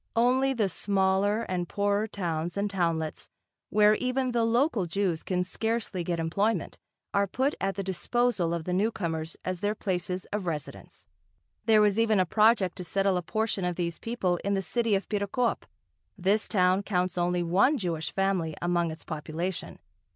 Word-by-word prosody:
Only 255 +3 +3
the 220 -5 +1
smaller 195 +3 +1
and 180 -4 -3
poorer 205 +1 +1
towns 175 -4 -3
and 200 +1 +1
townlets 165 -5 -2 0.4
where 210 0 +5
even 255 +2 0
the 235 -1 +1
local 230 - +2
Jews 175 -2 -1
can 180 -1 -1
scarcely 220 -1 -2
get 170 0 -2
employment, 200 +7 -1 0.3
are 200 0 +2
put 265 +9 0
at 195 0 0
the 195 - -3
disposal 195 0 0
of 170 -1 -2
the 180 - -3
newcomers 170 -6 -1
as 185 -1 -2
their 205 +3 -1
places 180 -2 -2
of 205 -3 -2
residence. 150 - -6 0.6
There 220 -2 +5
was 210 0 +3
even 220 -3 +3
a 185 - +3
project 210 -1 +3
to 180 - -5
settle 195 +2 +1
a 180 - 0
portion 215 +2 -1
of 180 -1 -1
these 170 -1 -3
people 195 -7 -1
in 200 0 +1
the 195 - -1
city 230 0 +1
of 195 - -2
Perekop. 210 +4 -1 0.5
This 200 +3 +2
town 185 -1 +3
counts 185 -3 -1
only 175 0 +1
one 195 - +3
Jewish 165 - -2
family 190 -5 0
among 175 -1 +1
its 160 0 -8
population. 165 +3 -4
195 Hz, 170 wpm, -28 LUFS, 175-215 Hz, 0.6 s, where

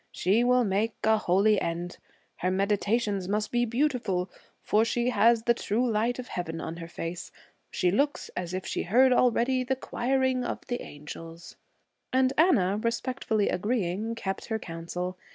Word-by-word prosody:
'She 205 +7 +2
will 250 0 +4
make 210 +2 0
a 220 0 +5
holy 200 +3 +3
end. 170 +1 -4 0.4
Her 180 - 0
meditations 200 +1 0
must 210 +2 -1
be 240 0 +2
beautiful, 235 -8 0 0.3
for 215 +1 +3
she 240 +2 0
has 225 +1 +4
the 235 - +4
true 235 +2 0
light 230 +2 0
of 250 -1 -7
Heaven 165 -2 -4
on 165 +1 -5
her 165 -1 -7
face. 170 0 -6 0.4
She 180 - +1
looks 285 +8 0
as 175 -1 -4
if 185 0 -4
she - - -2
heard 255 +7 +4
already 250 +1 +2
the 265 +1 0
choiring 260 0 0
of - - -4
the 245 0 -3
angels.' 165 +3 -10 0.6
And 260 +1 +3
Anna, 210 - +3
respectfully 230 -2 -1
agreeing, 210 +1 -1
kept 195 -4 -4
her 220 - -1
counsel. 180 0 -5
215 Hz, 160 wpm, -28 LUFS, 180-245 Hz, 0.6 s, a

